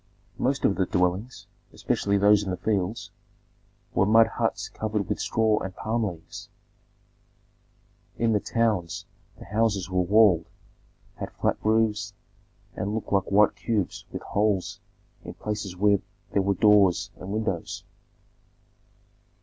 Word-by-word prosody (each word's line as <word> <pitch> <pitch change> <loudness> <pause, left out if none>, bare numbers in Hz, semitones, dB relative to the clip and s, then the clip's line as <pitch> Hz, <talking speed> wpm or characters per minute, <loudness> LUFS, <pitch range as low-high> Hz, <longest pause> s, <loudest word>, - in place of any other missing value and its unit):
Most 135 +2 0
of 100 - +2
the 95 -2 +1
dwellings, 90 +7 -1 0.3
especially 100 0 0
those 105 +1 +5
in 100 - -4
the 90 - -2
fields, 110 +2 -2 0.8
were 95 - +2
mud 115 +1 +6
huts 115 - -2
covered 105 -3 -3
with - - -2
straw 110 -1 +1
and 95 -1 -6
palm 115 +1 -1
leaves. 100 +1 -7 1.7
In 115 -1 +2
the 105 - +3
towns 105 -7 -1 0.3
the - - -12
houses 105 -4 0
were 90 0 +2
walled, 95 -2 +4 0.7
had - - -5
flat - - 0
roofs, 105 -2 +1 0.6
and 105 +2 -3
looked 110 - -5
like 95 -1 +3
white 105 +1 +4
cubes 105 -2 -2
with - - -6
holes 100 -3 0 0.4
in - - -8
places 105 -3 -4
where 100 +1 +3 0.3
there 100 - +2
were 100 +1 +1
doors 100 -3 +4
and 95 - -9
windows. 105 -5 -3
105 Hz, 135 wpm, -26 LUFS, 95-110 Hz, 1.7 s, mud